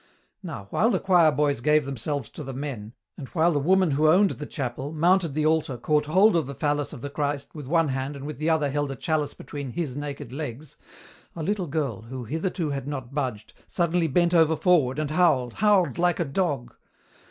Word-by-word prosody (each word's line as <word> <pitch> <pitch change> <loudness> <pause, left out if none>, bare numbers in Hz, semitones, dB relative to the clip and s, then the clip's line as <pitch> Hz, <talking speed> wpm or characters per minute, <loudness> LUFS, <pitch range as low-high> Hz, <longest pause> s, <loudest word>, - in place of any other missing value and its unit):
Now, 100 - -7
while 225 - +3
the - - +1
choir 175 -5 +4
boys 145 -3 0
gave 150 +2 +3
themselves 140 0 -3
to - - -8
the 135 -1 -7
men, 125 -6 -6 0.3
and 135 - -7
while 170 +3 +2
the 145 - +1
woman 185 +3 +3
who 150 +3 +3
owned 190 +5 +5
the 150 - -7
chapel, 135 +2 -4
mounted 170 -1 +2
the 155 0 +1
altar 155 -5 +1
caught 150 +4 +1
hold 190 +5 +5
of 160 -5 +1
the 140 - -6
phallus 145 +1 -1
of - - -9
the 140 - -5
Christ 145 -1 -3
with 150 -4 -8
one 165 0 +2
hand 135 +2 -3
and 140 0 -8
with 150 -1 -6
the 155 +2 0
other 155 -3 +1
held 145 0 -1
a 135 - -4
chalice 150 +3 -1
between 140 0 -7
"His" 155 -7 -3
naked 145 -3 -6
legs, 140 0 -6 0.6
a 165 - -4
little 195 0 -1
girl, 140 -8 -2
who 125 +3 -7
hitherto 160 - -2
had 140 -1 -4
not 135 -3 -5
budged, 130 -7 -3
suddenly 170 -1 +1
bent 175 +4 +2
over 160 -2 +4
forward 155 -8 +2
and 155 -1 -2
howled, 150 -8 +2
howled 190 - +2
like 175 0 +2
a 170 - +1
dog. 140 -5 -2
150 Hz, 210 wpm, -25 LUFS, 135-165 Hz, 0.6 s, owned